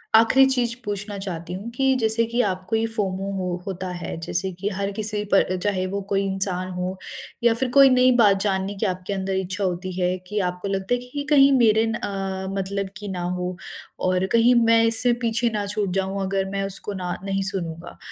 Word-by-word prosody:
आख़िरी 230 +4 +6
चीज़ 240 -3 0
पूछना 205 0 -4
चाहती 175 -3 -5
हूँ 200 +5 -6
कि 265 +2 +2
जैसे 225 +1 +2
कि 235 +2 -3
आपको 185 0 -1
ये 225 0 +1
फोमो 195 -2 -2
हो 180 -1 -2
होता 185 -1 -4
है। 175 -1 -5
जैसे 185 +3 -2
कि 200 - -1
हर 200 0 -3
किसी 210 0 -2
पर 185 -1 +3
चाहे 190 -3 0
वो 200 +1 -3
कोई 200 -1 +1
इंसान 190 -1 -2
हो 180 +1 -3 0.5
या 235 - +5
फिर 250 +3 -1
कोई 275 +1 +7
नई 255 0 +5
बात 205 -4 +5
जानने 195 0 -1
की 200 - -2
आपके 185 +1 -2
अंदर 195 0 -2
इच्छा 190 +1 -2
होती 185 0 -2
है 180 +1 +1
कि 210 +2 -2
आपको 180 +2 -6
लगता 195 +3 -1
है 245 - -3
कि 285 +1 -3
कहीं 275 -1 +7
मेरे 220 -2 +4
न 225 - -1
अ, 195 -3 -4
मतलब 195 0 -2
की 210 -1 -7
ना 180 -1 -4 0.2
हो 180 0 -3 0.5
और 185 0 +1
कहीं 235 +2 +5
मैं 230 0 +5
इससे 230 +2 +2
पीछे 230 +1 +1
ना 205 -1 -1
छूट 205 -2 -1
जाऊँ 195 +1 -2
अगर 195 0 -1
मैं 195 0 -1
उसको 200 +1 -1
ना 180 -2 -3
नहीं 195 0 -1
सुनूँगा। 170 -3 -6
195 Hz, 210 wpm, -23 LUFS, 185-225 Hz, 0.5 s, कोई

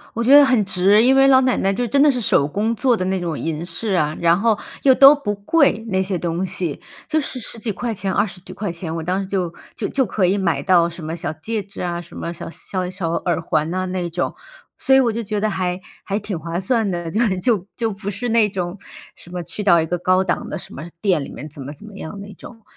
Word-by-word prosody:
我 230 - -1
觉 270 +4 +7
得 290 - +8
很 250 -5 +3
值。 195 +3 +4
因 265 +2 +5
为 270 0 +6
老 260 -1 +6
奶 255 -1 +2
奶 195 +1 +1
就 245 +3 -1
真 275 +4 +3
的 295 -1 +6
是 250 -2 -2
手 145 -8 +3
工 210 +8 -1
做 245 +1 +2
的 185 - -2
那 190 0 0
种 170 -4 -3
银 165 +1 -3
饰 185 +6 -1
啊， 155 -4 +1
然 170 +2 +4
后 225 -1 +2 0.3
又 265 -2 +7
都 275 +3 +8
不 210 -8 -3
贵 225 +3 +2
那 190 0 +1
些 185 -1 -2
东 170 +2 -2
西， 175 -5 -2 0.3
就 310 0 +1
是 270 -3 -4
10 230 - -4
几 220 -1 -3
块 230 +4 -3
钱、 195 -1 -2
20 200 -3 -1
几 - - -10
块 205 -5 -4
钱， 165 -1 -5
我 165 - -4
当 185 +3 -1
时 195 - -3
就 185 -3 -2 0.2
就 - - -3
就 265 -2 +1
可 195 -1 0
以 195 +3 +2
买 175 -4 0
到 175 -3 +3
什 170 -1 -9
么 160 +2 -4
小 160 - -3
戒 210 +7 -4
指 195 - -9
啊、 175 -1 -2
什 170 - -14
么 170 - -4
小 170 - -8
小 185 -1 -4
小 185 -3 -3
耳 170 0 -1
环 155 -1 0
呐 185 0 -1
那 180 -2 -3
种。 175 +2 -2 0.4
所 265 - +2
以 - - +7
我 240 -3 +3
就 230 0 -3
觉 210 0 -2
得 215 +1 +1
还 185 -2 -2 0.2
还 200 +2 -2
挺 200 -4 -4
划 165 +2 -4
算 220 +1 +1
的， 175 -2 -3
就 215 - -2 0.2
就 210 -6 +1
就 225 -2 -1
不 200 0 -6
是 245 +5 -4
那 225 -2 +4
种 180 0 -4 0.4
什 175 - -15
么 180 - -4
去 210 - -5
到 175 -4 +5
一 - - -1
个 175 +2 -2
高 185 +2 +2
档 180 - -2
的 - - -4
什 - - -10
么 145 - -7 0.2
店 180 -7 +1
里 - - -8
面 150 - -8
怎 140 - -8
么 140 - -7
怎 205 - -13
么 210 -2 -12
样 200 +2 -7
那 200 0 -10
种。 225 -3 -13
190 Hz, 280 characters per minute, -20 LUFS, 175-220 Hz, 0.4 s, 得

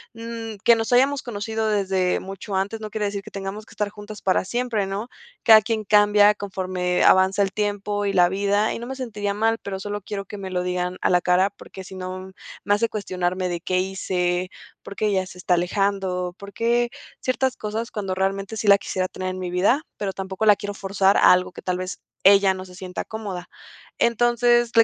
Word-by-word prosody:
mm, 230 -1 -6
que 235 - +7
nos 225 0 -2
hayamos 270 +2 +4
conocido 220 -1 -3
desde 190 -3 +1
mucho 195 +1 -6
antes 205 +4 -2
no 215 - -5
quiere 210 -1 -2
decir 200 0 -3
que - - -10
tengamos 195 +2 -6
que - - -15
estar 210 -1 -2
juntas 210 0 -10
para 185 0 +2
siempre", 230 -2 -1
¿no? 205 +5 -4 0.3
Cada 220 -1 +8
quien 220 0 -2
cambia 205 0 +5
conforme 185 -3 -1
avanza 190 +2 +5
el 195 - -1
tiempo 205 0 -1
y 200 - 0
la 175 -2 +5
vida, 200 +2 +1
y - - -5
no 235 - -7
me 265 - -5
sentiría 210 -6 -3
mal, 225 +2 +1
pero 195 -1 -5
solo 205 +1 -4
quiero 195 0 -5
que 205 - -8
me 190 -1 -5
lo 180 -1 -1
digan 180 0 -2
a - - +2
la 180 0 +4
cara, 185 +2 +3
porque 190 - -11
si 185 - -11
no, 185 0 -6 0.3
me 205 - +3
hace 225 +3 +1
cuestionarme 185 -3 -2
de: 170 -1 -3
"¿Qué 185 0 -1
hice? 185 -1 -1 0.3
¿Por 200 - -9
qué 215 - -1
ella 190 -2 +1
se 180 - -12
está 180 0 0
alejando?". 180 0 -1
Por 200 0 -9
qué 235 +1 +1 0.3
ciertas 260 0 0
cosas, 220 +2 -4
cuando 195 -3 -3
realmente 195 +3 -2
sí 215 - -3
la 200 0 +7
quisiera 185 -1 -2
tener 185 0 -5
en 185 - -5
mi 180 -1 -4
vida, 205 - +2
pero 195 -2 -3
tampoco 190 +2 -3
la 210 - +8
quiero 205 0 -5
forzar 195 0 +2
a - - +7
algo 185 0 0
que - - -10
tal 180 -1 -1
vez 185 +1 -5 0.2
ella 195 0 +6
no 185 0 -7
se 180 - -13
sienta 185 0 -6
cómoda. 200 -5 -6 0.5
Entonces, 240 0 +3
le 230 - +8
200 Hz, 215 wpm, -23 LUFS, 185-215 Hz, 0.5 s, Cada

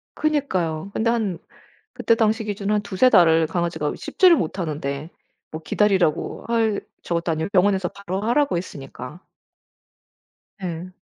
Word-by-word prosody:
그니까요. 195 - -1
근데 225 +1 +1
한 215 -7 -1 0.6
그때 230 - +2
당시 220 0 +1
기준으로 205 0 -1
한 210 - +1
2-3 205 +4 +3
달을 165 -5 +5
강아지가 165 -3 -2
씹지를 360 -3 +4
못하는데 155 -3 -3 0.4
뭐 155 - -6
기다리라고 190 -4 +1
할 225 -3 +1 0.2
저것도 170 0 -1
아니고 160 +3 -2
병원에서 190 -1 +2
바로 195 -1 -5
하라고 245 +3 +1
했으니까. 140 -3 -8 1.4
네. 180 0 -6
185 Hz, 305 characters per minute, -22 LUFS, 165-215 Hz, 1.4 s, 달을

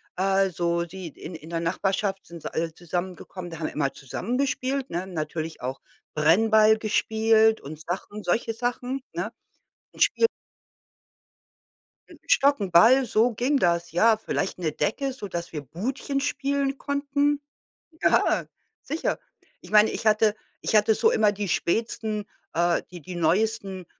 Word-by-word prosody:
also, 185 -3 +1
sie 185 +1 -8
in 160 +2 -9
in 160 0 -11
der 165 -1 -2
Nachbarschaft 195 +3 -1
sind 170 -1 -10
sie - - -6
alle 165 0 -2
zusammengekommen, 175 +1 -5
da 165 - -8
haben 160 - -3
wir - - -7
immer 140 -2 0
zusammen 185 - -4
gespielt, 270 -1 -1
ne? 175 +2 -3
Natürlich 160 -3 -4
auch 130 +2 -4 0.3
Brennball 215 +8 +5
gespielt 220 0 +3
und 150 +2 -9
Sachen, 190 +5 -5
solche 225 +4 0
Sachen, 245 +3 -3
ne? - - -3 0.6
Ein - - -14
Spiel. 460 - +4 1.8
'N - - -15
Stock, 285 - +4
'n 195 -3 -3
Ball, 245 +10 +6
so 230 +1 +3
ging 255 +6 +1
das, 170 -5 +1
ja. 220 +7 +4
Vielleicht 195 -3 -2
'ne 165 -3 -1
Decke, 270 - -1
sodass 180 -8 -6
wir 150 - -3
Budchen 250 - -3
spielen 280 -1 -1
konnten. 285 +1 0 0.6
Ja, - - +3 0.4
sicher. 310 +4 -2 0.4
Ich - - -13
meine, 215 0 +6
ich - - -5
hatte 215 0 +4 0.3
ich - - 0
hatte 215 +1 +5
so - - +3
immer 215 -2 +3
die 205 -1 -4
spätsten 215 +3 -1 0.3
äh, 170 +1 +2
die 175 -2 -9
die 180 +5 -8
neuesten, 190 +2 0
205 Hz, 150 wpm, -25 LUFS, 170-235 Hz, 1.8 s, Ball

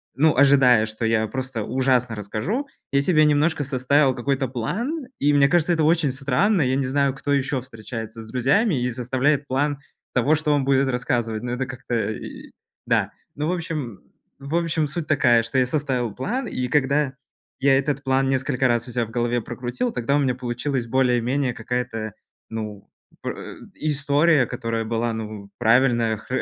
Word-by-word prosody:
ну, 150 +1 +3
ожидая, 135 -5 +6
что 110 +1 -6
я 110 -1 +2
просто 130 -3 -4
ужасно 125 -2 +1
расскажу, 130 - -3 0.2
я 140 0 +3
себе 155 0 +4
немножко 150 +1 +2
составил 135 +1 +2
какой-то 135 +1 -1
план. 235 - -3
И 145 +1 +3
мне 140 -1 +5
кажется, 175 +1 +3
это 160 -2 +1
очень 160 -3 +3
странно. 150 +9 +1
Я 130 -1 +2
не 135 -1 0
знаю, 140 0 +1
кто 145 +1 -2
ещё 135 -1 0
встречается 115 -2 -8
с 110 - -13
друзьями 145 - +2
и 125 0 0
составляет 130 +4 0
план 145 +2 0 0.3
того, 135 +5 +3
что 150 -1 0
он 140 -2 +2
будет 135 0 +3
рассказывать. 120 -3 -1
Ну, 120 - -3
это 130 +2 -2
как-то 125 -3 -3
и - - -9 0.3
Да. - - +1 0.2
Ну, 150 +2 -2
в - - +1
общем 155 - -4 0.4
В 140 +4 -4
общем, 165 -3 +1
суть 155 +2 -4
такая, 120 -6 +4
что 115 +3 -3
я 130 - +4
составил 130 -5 -1
план, 235 - -3
и 125 -8 -2
когда 140 0 +1 0.5
я 135 0 +4
этот 140 0 -1
план 135 0 +2
несколько 135 0 +1
раз 120 0 0
у - - -7
себя 120 -1 0
в - - -13
голове 120 0 0
прокрутил, 125 - -3
тогда 125 +4 0
у - - +3
меня 130 -3 +1
получилась 125 +1 -3
более-менее 125 +1 +1
какая-то, 115 -2 -3 0.4
ну, 105 -3 -6 0.4
пр - - -3
э, - - -8 0.2
история, 145 -1 +2
которая 115 -2 -3
была, 115 +1 -1
ну, 105 -2 -6
правильная 120 -1 +3
хр 130 +5 -3
130 Hz, 175 wpm, -23 LUFS, 120-145 Hz, 0.5 s, ожидая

